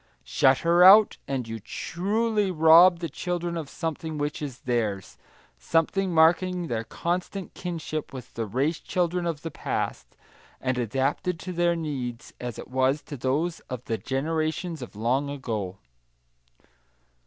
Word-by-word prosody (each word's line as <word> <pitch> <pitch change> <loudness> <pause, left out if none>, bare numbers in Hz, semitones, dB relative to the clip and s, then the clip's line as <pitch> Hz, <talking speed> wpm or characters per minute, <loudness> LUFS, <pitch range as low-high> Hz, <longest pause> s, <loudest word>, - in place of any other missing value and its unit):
Shut 130 0 +4
her 170 +1 +5
out, 205 +3 +8
and 130 -4 -2
you 115 0 -5
truly 205 - -1
rob 170 +1 +6
the 170 - -1
children 175 +2 -3
of 160 -4 -5
something 160 -1 -4
which 145 +1 -3
is 135 -4 -6
theirs; 110 -6 -2 0.4
something 180 +4 +1
marking 175 +2 +3
their 115 -7 -2
constant 180 - -3
kinship 165 -3 -5
with 125 -2 -9
the 115 -1 -3
race 140 - 0
children 175 -1 -1
of 155 -3 -3
the 165 - -4
past, - - -4 0.4
and 130 -1 -1
adapted 135 - -1
to 185 - -5
their 175 0 +2
needs 130 -7 -5
as 120 -2 -5
it - - -9
was 130 +3 +1
to 145 - -7
those 145 +7 -1
of 125 -1 -6
the 115 - -2
generation 155 +5 -2
of 125 - -9
long 125 +6 0
ago! 110 -9 -4
155 Hz, 145 wpm, -26 LUFS, 130-175 Hz, 0.4 s, out